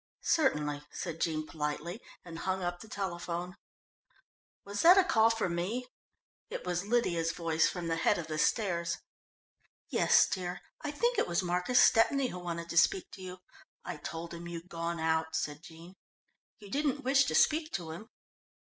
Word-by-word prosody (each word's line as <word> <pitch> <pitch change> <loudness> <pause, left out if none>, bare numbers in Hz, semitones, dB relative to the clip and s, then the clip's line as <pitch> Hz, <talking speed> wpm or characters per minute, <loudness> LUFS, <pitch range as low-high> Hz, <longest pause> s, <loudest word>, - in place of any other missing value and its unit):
"Certainly," 150 - +1
said 165 -2 -5
Jean 155 -2 0
politely, 155 +7 -4 0.2
and 165 -1 -8
hung 190 +1 -2
up 175 0 -2
the 220 - -11
telephone. 180 -3 -4 1.1
"Was 200 0 -3
that 355 +3 +8
a 385 - +7
call 225 -10 +4
for 225 -4 0
me?" 180 +9 -2 0.6
It - - -6
was 180 +2 -2
Lydia's 175 -8 +1
voice 165 -2 +1
from 175 -1 -5
the 165 0 -1
head 165 - +3
of 170 - -4
the 155 -1 -4
stairs. 170 -3 +1 0.9
"Yes, - - +5
dear. 180 -2 -4 0.2
I 295 - -3
think 475 +12 +1
it - - +1
was 175 +2 0
Marcus 180 +7 +2
Stepney 255 +3 +4
who 180 - -6
wanted 170 -1 -4
to 170 - -3
speak 185 +2 +2
to - - -11
you. 185 0 -8 0.4
I 180 -3 -4
told 165 +2 -6
him 170 0 -7
you'd 170 +1 -7
gone 170 -1 -3
out," 160 0 0
said 150 -1 -2
Jean. 170 +1 -13 0.6
"You 205 -3 -13
didn't 285 -1 0
wish 270 +1 +4
to - - -1
speak 310 +1 +3
to 165 -3 -3
him?" 215 +8 -9
175 Hz, 175 wpm, -31 LUFS, 165-220 Hz, 1.1 s, that